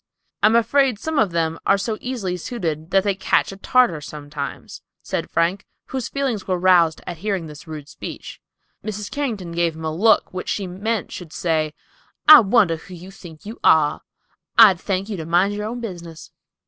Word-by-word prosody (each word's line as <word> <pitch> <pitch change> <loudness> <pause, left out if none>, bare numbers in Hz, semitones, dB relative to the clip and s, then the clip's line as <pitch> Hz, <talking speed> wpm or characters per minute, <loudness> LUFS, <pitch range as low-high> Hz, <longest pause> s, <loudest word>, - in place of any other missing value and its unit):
"I - - +6
am 220 - +3
afraid 245 +1 +3
some 315 +7 -2
of 210 - +3
them 165 -1 -1
are - - +3
so 215 +2 -3
easily 230 -8 -3
suited 165 -5 -4
that 195 0 +3
they 200 -1 +1
catch 190 0 +1
a - - -8
Tartar 200 - +2
sometimes," 145 -1 -7 0.2
said - - -3
Frank, 175 +4 0 0.2
whose 260 -2 -4
feelings 265 -8 -2
were 185 -1 0
roused 175 -3 +3
at 175 - -6
hearing 195 -3 -2
this 150 +1 -11
rude 155 -2 -8
speech. - - -9 0.4
Mrs. 210 -1 -5
Carrington 220 -12 -3
gave 170 -1 0
him 160 0 -7
a 155 - -2
look 220 +3 +3
which 185 - -5
she 200 - -2
meant 200 +4 -3
should 175 -4 -8
say, 160 -3 -1 0.5
"I 310 -1 +12
wonder 195 -6 +3
who 180 +3 -12
you 180 +3 -11
think 170 -4 -13
you 220 +3 -8
are. 155 -2 +4 0.6
I'd 185 -3 +8
thank 195 0 -2
you 210 -3 -5
to 160 - -6
mind 180 +4 +2
your 210 +1 -4
own 240 +2 -5
business." 170 -7 -8
185 Hz, 190 wpm, -21 LUFS, 165-215 Hz, 0.6 s, I